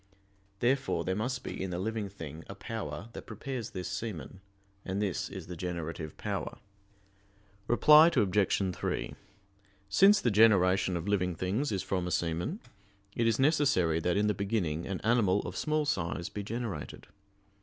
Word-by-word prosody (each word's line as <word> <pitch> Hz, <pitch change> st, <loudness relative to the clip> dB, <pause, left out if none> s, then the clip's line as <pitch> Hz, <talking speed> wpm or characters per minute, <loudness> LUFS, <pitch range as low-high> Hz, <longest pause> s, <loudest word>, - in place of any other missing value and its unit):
Therefore 135 Hz, +3 st, +1 dB
there 95 Hz, -, 0 dB
must 125 Hz, +4 st, -2 dB
be -, -, -5 dB
in 95 Hz, -, -2 dB
the 90 Hz, -, -3 dB
living 105 Hz, +2 st, -2 dB
thing 80 Hz, -4 st, -9 dB
a 100 Hz, -, -7 dB
power 100 Hz, -3 st, -6 dB
that -, -, -9 dB
prepares 115 Hz, +2 st, -5 dB
this 90 Hz, -2 st, -5 dB
semen; 95 Hz, -1 st, -5 dB, 0.4 s
and 95 Hz, +1 st, -3 dB
this 100 Hz, -4 st, -1 dB
is -, -, -7 dB
the 90 Hz, -, -7 dB
generative 85 Hz, -2 st, -5 dB
power. -, -, -4 dB, 1.1 s
Reply 150 Hz, +6 st, +7 dB
Obj. 100 Hz, -, +2 dB
3: -, -, -3 dB, 0.7 s
Since 195 Hz, -, +6 dB
the 120 Hz, -, +2 dB
generation 95 Hz, -4 st, +4 dB
of 85 Hz, +3 st, -5 dB
living 90 Hz, -4 st, +1 dB
things 100 Hz, -, -1 dB
is 95 Hz, -3 st, -1 dB
from 90 Hz, -2 st, -2 dB
a -, -, -3 dB
semen, 85 Hz, -, -1 dB, 0.6 s
it 115 Hz, -, +2 dB
is 115 Hz, -1 st, +2 dB
necessary 135 Hz, -, +3 dB
that 90 Hz, +3 st, 0 dB
in 105 Hz, -, +2 dB
the 105 Hz, -, +2 dB
beginning 95 Hz, -5 st, -2 dB
an 95 Hz, -1 st, -4 dB
animal 110 Hz, -4 st, +3 dB
of 90 Hz, -, -7 dB
small 155 Hz, +4 st, 0 dB
size 85 Hz, -, -2 dB
be 105 Hz, -, -5 dB
generated. 105 Hz, -, -5 dB
100 Hz, 160 wpm, -30 LUFS, 90-115 Hz, 1.1 s, Reply